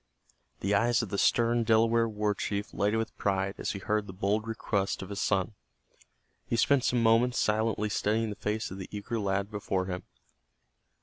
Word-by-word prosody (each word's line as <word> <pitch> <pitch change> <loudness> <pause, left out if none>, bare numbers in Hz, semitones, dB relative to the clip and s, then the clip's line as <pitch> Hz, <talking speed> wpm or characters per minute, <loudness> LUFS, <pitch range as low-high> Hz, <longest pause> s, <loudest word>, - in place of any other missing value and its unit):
The 100 +2 0
eyes 115 +3 +3
of 110 - -5
the 100 - -2
stern 120 0 +3
Delaware 115 +1 +3
war 105 -1 0
chief 100 +1 -3
lighted 105 +2 +1
with 115 0 -3
pride 95 -1 0
as - - -2
he - - -4
heard 105 +1 -1
the 95 - -8
bold 105 +4 -1
request 100 -4 -1
of 95 - -9
his 100 -1 -4
son. 95 +1 +1 0.9
He - - 0
spent 130 +3 +3
some 120 -2 +2
moments 115 +2 +4
silently 105 0 +1
studying 110 +2 0
the - - -5
face 105 +1 -3
of 95 - -7
the 95 - -7
eager 110 +3 -4
lad 100 0 -1
before 100 -3 -2
him. 90 -1 -4
105 Hz, 185 wpm, -29 LUFS, 100-115 Hz, 0.9 s, moments